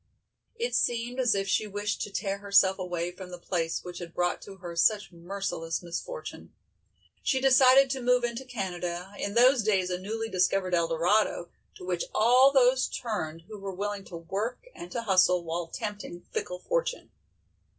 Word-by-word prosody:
It 470 Hz, +2 st, -2 dB
seemed 240 Hz, +2 st, 0 dB
as 245 Hz, -5 st, +3 dB
if 195 Hz, 0 st, -1 dB
she 210 Hz, +3 st, +1 dB
wished 205 Hz, 0 st, -3 dB
to -, -, -3 dB
tear 195 Hz, 0 st, -2 dB
herself 200 Hz, -1 st, +4 dB
away 175 Hz, -1 st, -3 dB
from 180 Hz, 0 st, -10 dB
the 180 Hz, -, -7 dB
place 170 Hz, -2 st, -2 dB
which 180 Hz, 0 st, -7 dB
had 170 Hz, -1 st, -9 dB
brought 175 Hz, 0 st, 0 dB
to 195 Hz, -, -10 dB
her 175 Hz, -2 st, -8 dB
such 205 Hz, +4 st, +2 dB
merciless 170 Hz, -1 st, -4 dB
misfortune. 460 Hz, -, -7 dB, 0.7 s
She 265 Hz, -, +1 dB
decided 265 Hz, 0 st, +6 dB
to 265 Hz, -1 st, -2 dB
move 250 Hz, 0 st, +3 dB
into 240 Hz, +2 st, -2 dB
Canada, 180 Hz, -6 st, -4 dB
in 200 Hz, -, -3 dB
those 250 Hz, +1 st, +6 dB
days 195 Hz, -4 st, +1 dB
a 180 Hz, -, -2 dB
newly 225 Hz, +4 st, -4 dB
discovered 185 Hz, -1 st, +1 dB
Eldorado, 170 Hz, +3 st, +1 dB, 0.3 s
to -, -, -10 dB
which 180 Hz, -2 st, -1 dB
all 250 Hz, +5 st, +6 dB
those 260 Hz, -1 st, +4 dB
turned 165 Hz, -9 st, -4 dB
who 210 Hz, +3 st, -10 dB
were 195 Hz, -1 st, -6 dB
willing 205 Hz, +1 st, -3 dB
to 170 Hz, -, -8 dB
work 205 Hz, -, -4 dB
and 345 Hz, 0 st, -10 dB
to 235 Hz, -, -3 dB
hustle 185 Hz, -3 st, +4 dB
while 165 Hz, 0 st, -3 dB
tempting 205 Hz, -3 st, -6 dB
fickle 180 Hz, -, -3 dB
fortune. -, -, -2 dB
200 Hz, 170 wpm, -28 LUFS, 180-240 Hz, 0.7 s, decided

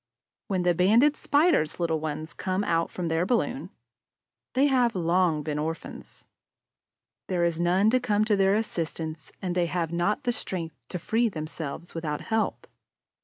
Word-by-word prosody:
When 185 Hz, -3 st, 0 dB
the 175 Hz, 0 st, +3 dB
Banded 225 Hz, -, +4 dB
Spider's 290 Hz, -, +2 dB
little 165 Hz, -2 st, 0 dB
ones 155 Hz, 0 st, -4 dB
come 190 Hz, +4 st, -1 dB
out 165 Hz, -4 st, +1 dB
from 180 Hz, -2 st, -4 dB
their 165 Hz, +1 st, +1 dB
balloon, 250 Hz, +6 st, 0 dB, 0.8 s
they 265 Hz, +2 st, +4 dB
have 250 Hz, -5 st, +3 dB
long 170 Hz, -3 st, +2 dB
been 150 Hz, 0 st, -2 dB
orphans. 160 Hz, +2 st, -6 dB, 1.0 s
There 180 Hz, -2 st, 0 dB
is 170 Hz, -1 st, 0 dB
none 185 Hz, +5 st, +3 dB
to 255 Hz, -, +4 dB
come 215 Hz, -4 st, +1 dB
to 215 Hz, -2 st, +3 dB
their 195 Hz, 0 st, +3 dB
assistance; 165 Hz, -, -3 dB
and 180 Hz, -2 st, -1 dB
they 175 Hz, -1 st, +1 dB
have 170 Hz, -1 st, -2 dB
not 175 Hz, +5 st, 0 dB
the 245 Hz, -, +1 dB
strength 165 Hz, -8 st, -4 dB
to -, -, -3 dB
free 225 Hz, +6 st, +1 dB
themselves 155 Hz, -1 st, -6 dB
without 155 Hz, -3 st, -3 dB
help. 225 Hz, 0 st, -1 dB
180 Hz, 160 wpm, -27 LUFS, 165-215 Hz, 1.0 s, Banded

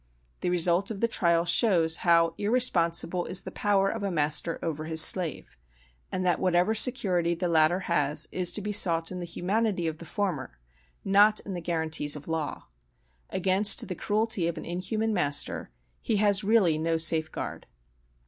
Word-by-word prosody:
The -, -, -2 dB
result 175 Hz, +2 st, +2 dB
of 215 Hz, -3 st, -6 dB
the 230 Hz, -, +1 dB
trial 170 Hz, -6 st, +1 dB
shows 170 Hz, -3 st, +2 dB
how 165 Hz, -1 st, +2 dB
irresponsible 180 Hz, -6 st, +1 dB
is 185 Hz, +1 st, +2 dB
the -, -, -8 dB
power 200 Hz, -2 st, +1 dB
of 225 Hz, +2 st, -3 dB
a 200 Hz, -, -2 dB
master 155 Hz, 0 st, -1 dB
over 155 Hz, -2 st, -4 dB
his 160 Hz, 0 st, 0 dB
slave; 160 Hz, -, +2 dB, 0.5 s
and 185 Hz, 0 st, -3 dB
that 175 Hz, -, +1 dB
whatever 180 Hz, +3 st, +1 dB
security 190 Hz, -8 st, +1 dB
the 175 Hz, +2 st, -2 dB
latter 165 Hz, +2 st, +2 dB
has 150 Hz, -3 st, -1 dB
is 180 Hz, -1 st, 0 dB
to 210 Hz, -, -3 dB
be 210 Hz, +1 st, -4 dB
sought 170 Hz, -5 st, +2 dB
in 180 Hz, -, -6 dB
the 175 Hz, -, -5 dB
humanity 190 Hz, +2 st, -2 dB
of 160 Hz, -1 st, -4 dB
the 170 Hz, -, -10 dB
former, 180 Hz, -, -4 dB, 0.5 s
not 205 Hz, +2 st, +4 dB
in 195 Hz, -, -7 dB
the 175 Hz, -, -5 dB
guarantees 160 Hz, -3 st, -1 dB
of 150 Hz, 0 st, -10 dB
law. 160 Hz, -2 st, -4 dB, 0.6 s
Against 190 Hz, +2 st, +2 dB
the 185 Hz, -, -4 dB
cruelty 210 Hz, -1 st, -1 dB
of 170 Hz, -, -4 dB
an -, -, -7 dB
inhuman 215 Hz, +6 st, -3 dB
master 145 Hz, -7 st, 0 dB, 0.3 s
he 220 Hz, -, -1 dB
has 205 Hz, 0 st, +2 dB
really 195 Hz, -7 st, +2 dB
no 165 Hz, +1 st, 0 dB
safeguard. 160 Hz, -1 st, -1 dB
175 Hz, 170 wpm, -27 LUFS, 165-200 Hz, 0.6 s, not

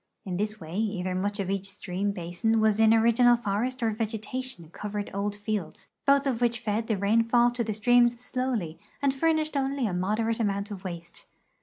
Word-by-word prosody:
In 180 Hz, -2 st, -3 dB
this 210 Hz, +2 st, -1 dB
waj' 175 Hz, -1 st, -6 dB
either 190 Hz, -4 st, -1 dB
much 200 Hz, +3 st, -2 dB
of 195 Hz, -1 st, -1 dB
each 195 Hz, 0 st, -2 dB
stream 195 Hz, 0 st, -3 dB
basin 195 Hz, +5 st, -1 dB
was 215 Hz, -1 st, +3 dB
in 220 Hz, 0 st, +6 dB
original 235 Hz, +2 st, +5 dB
forest 235 Hz, +3 st, -2 dB
or 225 Hz, -, +2 dB
vegetation 220 Hz, -3 st, -4 dB
covered 210 Hz, +1 st, -5 dB
old 200 Hz, +1 st, -2 dB
fields, 205 Hz, -5 st, -4 dB, 0.2 s
both 280 Hz, 0 st, +5 dB
of 250 Hz, -4 st, -1 dB
which 235 Hz, -1 st, +1 dB
fed 220 Hz, 0 st, -2 dB
the 220 Hz, -, 0 dB
rainfall 230 Hz, +4 st, +3 dB
to 240 Hz, 0 st, -2 dB
the 215 Hz, -2 st, -3 dB
streams 240 Hz, +2 st, +4 dB
slowl}' 245 Hz, -10 st, -3 dB, 0.2 s
and 280 Hz, -1 st, +2 dB
furnished 310 Hz, +1 st, +1 dB
only 275 Hz, -1 st, 0 dB
a 200 Hz, -, -1 dB
moderate 215 Hz, +5 st, 0 dB
amount 200 Hz, -1 st, -1 dB
of 195 Hz, -1 st, -7 dB
waste. 170 Hz, -2 st, -8 dB
220 Hz, 185 wpm, -27 LUFS, 200-240 Hz, 0.2 s, in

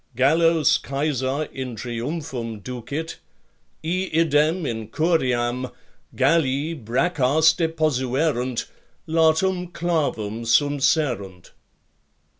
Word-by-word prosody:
Gallos 160 Hz, +4 st, +4 dB
Caesar 140 Hz, 0 st, -1 dB
in 130 Hz, -3 st, -5 dB
triumphum 120 Hz, -1 st, -5 dB
ducit: 125 Hz, +8 st, -5 dB, 0.7 s
iidem 165 Hz, -2 st, +1 dB
in 110 Hz, -2 st, -4 dB
curiam 125 Hz, -4 st, 0 dB, 0.4 s
Galli 150 Hz, -1 st, +2 dB
braccas 155 Hz, +4 st, +2 dB
deposuerunt, 145 Hz, -5 st, 0 dB, 0.4 s
latum 165 Hz, +3 st, +2 dB
clavum 140 Hz, -12 st, -1 dB
sumpserunt. 125 Hz, -, +1 dB
145 Hz, 70 wpm, -23 LUFS, 125-160 Hz, 0.7 s, Gallos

